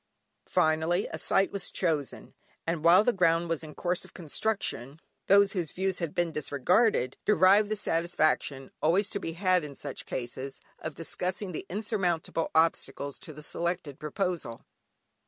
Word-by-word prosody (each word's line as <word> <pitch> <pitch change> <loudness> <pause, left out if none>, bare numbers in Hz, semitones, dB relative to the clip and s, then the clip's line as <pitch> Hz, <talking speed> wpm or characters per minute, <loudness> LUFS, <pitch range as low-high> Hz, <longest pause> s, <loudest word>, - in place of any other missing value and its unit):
Finally, 160 +4 +2
a - - -5
site 195 0 +2
was 200 -3 -4
chosen, 155 -6 -2 0.3
and 165 -1 -2
while 175 +4 +7
the 245 - +2
ground 170 -2 +3
was 165 -1 -2
in 150 -2 -10
course 175 0 -1
of - - -16
construction, 160 - -3 0.3
those 200 0 +6
whose 175 -6 -3
views 190 0 -1
had 170 -4 -3
been 175 -1 +1
disregarded, 150 - +1
derived 205 0 +5
the 215 - 0
satisfaction 160 -7 0
(always 190 +6 +2
to - - -2
be 165 - -4
had 185 0 +2
in 145 -2 -7
such - - -7
cases) 130 +2 -5 0.2
of 155 -2 -5
discussing 185 +3 -2
the 175 - -6
insurmountable 180 -5 -1
obstacles 145 -3 +1
to 175 - -10
the 150 0 -11
selected 170 -4 -3
proposal. 160 - -3
170 Hz, 155 wpm, -29 LUFS, 155-190 Hz, 0.3 s, while